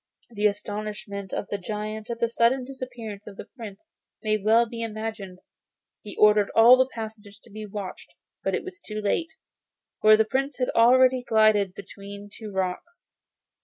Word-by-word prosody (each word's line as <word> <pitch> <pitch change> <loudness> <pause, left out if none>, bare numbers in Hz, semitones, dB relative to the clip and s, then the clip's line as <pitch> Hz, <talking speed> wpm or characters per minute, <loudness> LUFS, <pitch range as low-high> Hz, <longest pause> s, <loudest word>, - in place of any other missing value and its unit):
The 210 -1 +2
astonishment 205 -1 -5
of - - -3
the 205 - -2
giant 215 +3 -5
at 235 -1 -4
the 235 - +2
sudden 235 +3 +2
disappearance 245 -6 -8
of 200 -2 -10
the - - -8
Prince 220 +1 -11 0.4
may 215 0 +2
well 220 +3 +4
be 230 0 -7
imagined. 215 -4 -6 0.6
He 205 - -9
ordered 210 -1 +5
all 235 +3 +9
the 260 0 +2
passages 215 -2 -8
to 230 - -17
be 215 +1 -7
watched, 200 -2 -8 0.3
but - - 0
it - - -3
was 375 +1 -9
too 215 - -6
late, 215 +11 -1 0.7
for 215 0 +7
the 220 - +3
Prince 270 +4 -2
had 250 -1 0
already 255 +2 +5
glided 215 -5 +3
between 200 +1 -10
two 215 -2 -8
rocks. 190 - -4
215 Hz, 165 wpm, -25 LUFS, 205-235 Hz, 0.7 s, all